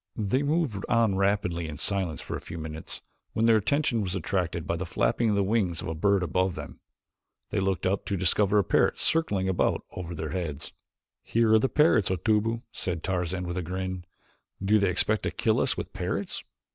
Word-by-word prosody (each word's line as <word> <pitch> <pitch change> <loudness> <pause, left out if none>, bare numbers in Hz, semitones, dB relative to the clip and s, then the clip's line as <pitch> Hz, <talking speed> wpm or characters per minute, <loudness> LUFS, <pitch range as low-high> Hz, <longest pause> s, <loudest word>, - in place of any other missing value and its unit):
They 110 +5 +1
moved 145 - 0
on 115 -3 +3
rapidly 95 -4 0
in 75 -2 -6
silence 95 -5 0
for - - -5
a - - -5
few 85 - -7
minutes 80 0 -5 0.3
when 110 - +1
their 115 -1 +6
attention 120 +1 +1
was 95 -2 -2
attracted 85 -2 -1
by 85 - -1
the 90 +3 -3
flapping 115 +6 +1
of 105 - +2
the 100 - +2
wings 95 -5 +1
of - - -5
a - - -2
bird 100 +4 +2
above 90 +2 0
them. - - -8 0.7
They - - 0
looked 95 -3 0
up 95 +1 0
to 100 - -1
discover 100 +3 +3
a 100 - +5
parrot - - +2
circling 105 -13 +1
about 95 -2 +1
over 85 -1 -6
their 80 -1 -4
heads. 80 -5 -4 0.5
"Here 115 -1 +2
are 110 - +7
the 130 - +1
parrots, 150 - +4
Otobu," 110 +5 +1
said 85 -3 -3
Tarzan 90 -1 -1
with 85 +1 -4
a - - -1
grin. 95 +1 -4 0.5
"Do 105 +2 +3
they 100 -2 +2
expect 105 +4 +2
to - - -1
kill - - +1
us - - +1
with - - -5
parrots?" - - -3
95 Hz, 200 wpm, -27 LUFS, 85-110 Hz, 0.7 s, are